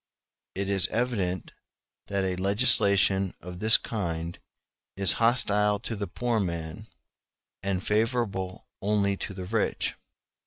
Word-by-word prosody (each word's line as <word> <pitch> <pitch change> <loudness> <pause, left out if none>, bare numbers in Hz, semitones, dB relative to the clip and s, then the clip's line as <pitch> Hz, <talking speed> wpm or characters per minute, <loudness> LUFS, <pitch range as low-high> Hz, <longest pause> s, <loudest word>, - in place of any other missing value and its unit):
It 100 +1 -2
is 100 -2 +1
evident 100 -7 -1 0.6
that 100 -1 -1
a 95 -1 0
legislation 100 -2 +3
of 90 0 -9
this 110 +3 +6
kind 85 -6 -4 0.6
is 100 -1 +6
hostile 105 -3 +3
to 115 - -4
the 100 -1 -4
poor 120 +5 -1
man, 85 -4 -4 0.7
and 95 -1 -1
favorable 105 -4 -1 0.2
only 100 -1 +1
to 95 - -5
the 90 -1 -6
rich. 110 +2 0
100 Hz, 120 wpm, -27 LUFS, 95-110 Hz, 0.7 s, this